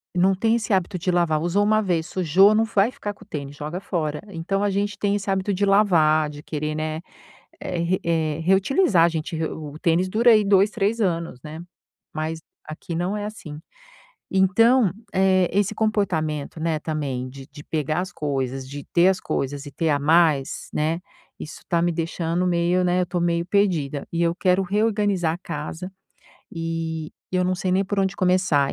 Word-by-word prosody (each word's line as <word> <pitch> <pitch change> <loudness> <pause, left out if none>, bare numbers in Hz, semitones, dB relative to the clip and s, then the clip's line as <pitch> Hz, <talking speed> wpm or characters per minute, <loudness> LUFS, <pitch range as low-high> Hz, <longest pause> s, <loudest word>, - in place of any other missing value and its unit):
Não 190 +2 +3
tem 225 +4 +2
esse 225 -2 -3
hábito 185 0 0
de 180 - -2
lavar. 170 -3 +2
Usou 175 +5 +1
1 215 +1 +3
vez, 170 -5 0
sujou, 185 +4 +4
não 220 +1 +3
vai 215 +1 +2
ficar 205 -4 -5
com - - -16
o - - -35
tênis, 145 -5 -6
joga 150 +5 -5
fora. 155 -6 -3
Então 195 +2 -2
a 205 - +2
gente 200 +1 -1
tem 205 0 0
esse 200 -1 -3
hábito 195 +1 0
de 200 +2 +1
lavar, 160 -7 +4
de 145 0 -10
querer, 155 0 -3
né, 155 +1 -3 0.6
eh, 175 - -4
re 170 +2 0
eh, 160 -2 0
reutilizar, 195 - +3
a 170 - +5
gente 160 +1 -4
re 160 0 -1
o 150 -1 -7
tênis 175 +2 +2
dura 235 +5 +4
aí, 215 -1 +4
2, 200 +1 +4
3 215 +1 -1
anos, 170 - -1
né. 155 +1 -7 0.5
Mas 160 +1 -3 0.2
aqui 155 +2 -7
não 180 +4 -1
é 205 - -4
assim. 160 -8 -8 0.7
Então, 200 +4 +4 0.2
eh, 185 -1 +3
esse 205 +2 +1
comportamento, 165 -9 -1
né, 160 -1 -1
também 140 -5 -3
de 135 +1 -11
de 145 0 -13
pegar 155 +1 -2
as 185 +1 -4
coisas, 135 -3 -3
de 145 +1 -7
ter 175 +2 +5
as 190 - +1
coisas 140 +1 -3
e - - -7
ter 160 +2 -1
a 145 - +2
mais, 155 -2 +2
né, 160 +3 0 0.4
isso 155 - -9
tá 170 -1 +1
me 175 0 +1
deixando 165 +1 -1
meio, 175 +1 +2
né, 180 0 +2
eu - - -2
tô 175 0 -2
meio 170 0 +1
perdida, 170 -8 0
e 170 - 0
eu 170 0 +2
quero 185 0 +2
reorganizar 200 -4 +1
a - - -8
casa 170 +2 -6 0.6
e 165 -1 -4 0.2
eu 185 0 +2
não 185 0 0
sei 185 0 -1
nem 195 +2 +2
por 200 +1 -3
onde 195 0 +1
começar. 180 -7 +2
175 Hz, 195 wpm, -23 LUFS, 155-195 Hz, 0.7 s, a